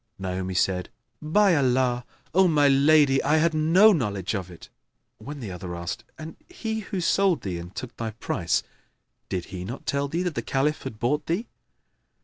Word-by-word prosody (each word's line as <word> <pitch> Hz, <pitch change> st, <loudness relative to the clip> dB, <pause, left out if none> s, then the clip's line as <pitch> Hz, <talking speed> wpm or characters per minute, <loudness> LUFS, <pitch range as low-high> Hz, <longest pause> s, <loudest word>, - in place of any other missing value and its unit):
Naomi 95 Hz, 0 st, -4 dB
said, 90 Hz, 0 st, 0 dB, 0.3 s
"By 180 Hz, +4 st, +3 dB
Allah, 125 Hz, -3 st, +1 dB, 0.3 s
O 190 Hz, +2 st, +5 dB
my 150 Hz, -4 st, +4 dB
lady, 140 Hz, 0 st, +5 dB
I 150 Hz, +3 st, +2 dB
had 165 Hz, +1 st, +2 dB
no 170 Hz, +8 st, +5 dB
knowledge 105 Hz, -, -2 dB
of 95 Hz, -3 st, -4 dB
it!"; 85 Hz, -, -12 dB, 0.5 s
when 145 Hz, 0 st, -8 dB
the 105 Hz, -5 st, -5 dB
other 90 Hz, -1 st, -6 dB
asked, 85 Hz, +2 st, -5 dB
"And 160 Hz, +1 st, -9 dB
he 220 Hz, -11 st, -4 dB
who 195 Hz, -2 st, -4 dB
sold 180 Hz, -1 st, +2 dB
thee 90 Hz, -3 st, -3 dB
and 85 Hz, +2 st, -10 dB
took 130 Hz, -, -7 dB
thy 115 Hz, -1 st, -3 dB
price 95 Hz, -5 st, -1 dB, 0.7 s
did 90 Hz, -3 st, -3 dB
he 90 Hz, -1 st, -5 dB
not 120 Hz, +8 st, -7 dB
tell 140 Hz, 0 st, 0 dB
thee 170 Hz, +5 st, -2 dB
that 180 Hz, -2 st, -2 dB
the -, -, -2 dB
Caliph 150 Hz, +3 st, 0 dB
had 130 Hz, -5 st, -7 dB
bought 145 Hz, +7 st, -1 dB
thee?" 180 Hz, +8 st, -1 dB
135 Hz, 180 wpm, -25 LUFS, 95-160 Hz, 0.7 s, O